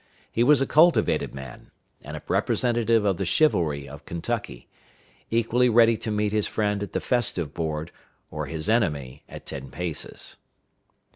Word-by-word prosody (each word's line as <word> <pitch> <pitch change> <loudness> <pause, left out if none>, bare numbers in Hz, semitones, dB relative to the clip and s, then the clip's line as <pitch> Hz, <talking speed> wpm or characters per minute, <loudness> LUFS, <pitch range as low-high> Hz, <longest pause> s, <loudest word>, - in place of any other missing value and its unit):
He 115 - +2
was 140 +1 +5
a - - -1
cultivated 165 - +3
man, 65 -2 -10 0.3
and - - -7
a - - -10
representative 115 -3 +1
of 95 -3 +1
the 95 - -2
chivalry 85 - +1
of 70 +3 -11
Kentucky, 80 -7 -4 0.6
equally 115 +2 +2
ready 115 0 +5
to 110 - -5
meet 105 -1 0
his 105 -1 0
friend 105 -1 -1
at 100 - -5
the - - 0
festive 95 - -1
board, 80 0 -3 0.4
or - - -4
his 80 +2 -3
enemy 75 - 0
at - - -10
ten 70 -1 -7
paces. 85 -1 -5
100 Hz, 155 wpm, -25 LUFS, 80-115 Hz, 0.6 s, was